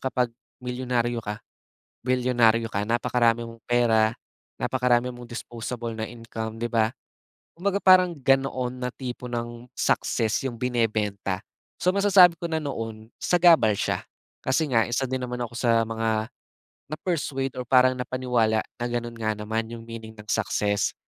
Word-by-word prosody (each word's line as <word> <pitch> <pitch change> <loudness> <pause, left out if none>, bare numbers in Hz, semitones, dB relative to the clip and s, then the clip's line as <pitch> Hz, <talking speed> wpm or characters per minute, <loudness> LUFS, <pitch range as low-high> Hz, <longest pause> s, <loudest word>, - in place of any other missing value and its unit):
kapag 125 -2 0 0.3
milyonaryo 125 -1 -1
ka, 105 -1 -6 0.6
bilyonaryo 120 -3 +3
ka, 100 +1 0
napakarami 120 0 +2
mong 115 0 -12
pera, 115 -2 +3 0.5
napakarami 125 0 +1
mong 120 -1 -11
disposable 120 0 -5
na 110 - -2
income, 115 -1 -6
'di 120 - -1
ba. 110 -2 +3 0.7
Kumbaga 195 +3 -1
parang, 185 -2 +6
ganoon 130 -2 +1
na 125 - -1
tipo 125 -1 -6
ng 120 0 -5
success 110 -1 +1
'yong 120 - -7
binebenta. 105 -6 0 0.4
So, 180 - +3
masasabi 190 -4 +6
ko 170 - -8
na 160 -1 -1
noon, 115 -6 -5
sagabal 170 -11 +5
siya, - - -1 0.4
kasi 155 +2 +1
nga, 115 -3 +4
isa 120 +3 0
din 130 - -1
naman 125 0 -4
ako 120 0 -6
sa 115 -2 +3
mga, 110 -1 -1 0.6
na-persuade 145 -5 -2
or 125 - -2
parang 130 +1 +5
napaniwala 125 -4 +1
na 120 - -7
gano'n 120 0 -3
nga 110 -1 -1
naman 110 +2 -2
'yong 115 -1 -8
meaning 110 -1 -8
ng 105 - -11
success. 105 -1 +1
120 Hz, 145 wpm, -25 LUFS, 115-130 Hz, 0.7 s, parang